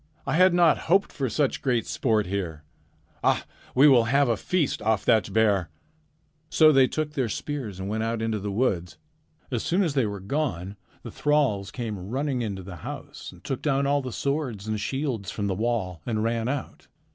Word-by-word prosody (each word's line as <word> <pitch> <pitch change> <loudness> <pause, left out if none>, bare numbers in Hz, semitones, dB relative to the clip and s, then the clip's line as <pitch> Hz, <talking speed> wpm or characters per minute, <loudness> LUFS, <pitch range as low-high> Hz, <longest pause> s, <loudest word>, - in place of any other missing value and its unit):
I - - -1
had 185 +3 +6
not 170 -3 +5
hoped 195 +3 +3
for 135 -3 -2
such 140 +4 0
great 125 -4 +1
sport 110 -4 +1
here. 90 -5 -4 0.6
Ah, - - +2 0.3
we 135 +4 +7
will 125 -5 +6
have 140 +2 +3
a 115 - +3
feast 165 - -1
off 110 -2 +1
that 110 -3 +3
bear!' 100 -4 +2 0.8
"So 155 -1 +6
they 135 -3 +5
took 155 +1 -3
their 130 -5 -1
spears 120 -6 -4
and 95 - -4
went 110 +2 -2
out 115 0 -1
into 110 -1 -1
the 100 +1 -4
woods. 100 -6 -1 0.5
As 120 -3 -1
soon 185 +4 +1
as 165 -6 0
they 135 -6 +2
were 100 -1 -5
gone, 100 - -2 0.3
the - - -7
thralls 140 -10 +1
came 105 -6 -5
running 135 +1 -1
into 100 -4 -4
the 90 -1 -9
house - - -8
and - - -17
took 135 - -3
down 140 -2 +1
all 140 +1 +2
the 130 -1 -5
swords 130 -7 -2
and 110 -1 -1
shields 130 -4 -2
from 105 - -3
the 100 - 0
wall 95 -5 -2
and 110 -2 0
ran 115 0 0
out. 140 +1 -4
115 Hz, 195 wpm, -26 LUFS, 100-140 Hz, 0.8 s, we